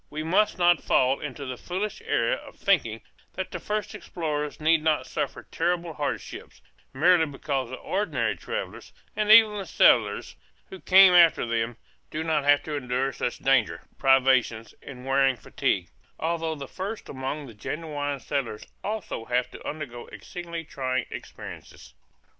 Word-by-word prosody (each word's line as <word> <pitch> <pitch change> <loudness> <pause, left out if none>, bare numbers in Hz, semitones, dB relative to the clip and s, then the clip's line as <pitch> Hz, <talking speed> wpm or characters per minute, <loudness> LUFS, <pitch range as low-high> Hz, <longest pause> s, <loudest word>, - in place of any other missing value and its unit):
We 155 +1 -4
must 190 +7 +2
not 175 -2 +4
fall 130 +1 +2
into 140 -1 -6
the 130 -1 -5
foolish 195 +4 -4
error - - +1
of - - -7
thinking - - +1 0.3
that - - -5
the - - -5
first 210 0 -3
explorers 150 -7 -4
need 155 +1 +3
not 155 -1 +1
suffer - - -4
terrible 170 0 -1
hardships, 145 -1 -5 0.3
merely 165 +3 +4
because 135 -3 -3
the 130 - -5
ordinary 200 +9 -1
travellers, 485 +2 -6 0.2
and 210 -1 -1
even 215 -1 +7
the 195 - -5
settlers - - +3 0.4
who 380 - -8
come 190 0 +7
after 170 -6 +6
them, 115 0 -2 0.3
do 155 +1 -3
not 155 -3 0
have 145 0 +5
to 155 - -5
endure 130 0 -1
such 120 - -3
danger, 135 -1 +1 0.2
privation, 130 -4 +3 0.2
and 125 -2 -10
wearing 135 0 +3
fatigue - - -1 0.3
although 165 -1 -1
the 140 -2 -7
first 200 +8 -6
among 135 +2 -4
the 120 - -11
genuine 145 +4 -4
settlers 125 -4 -3 0.2
also 210 - -4
have 125 +1 0
to - - -10
undergo 140 -6 -7
exceedingly 170 -2 -7
trying 130 -4 -2
experiences. - - -10
150 Hz, 155 wpm, -26 LUFS, 135-175 Hz, 0.4 s, even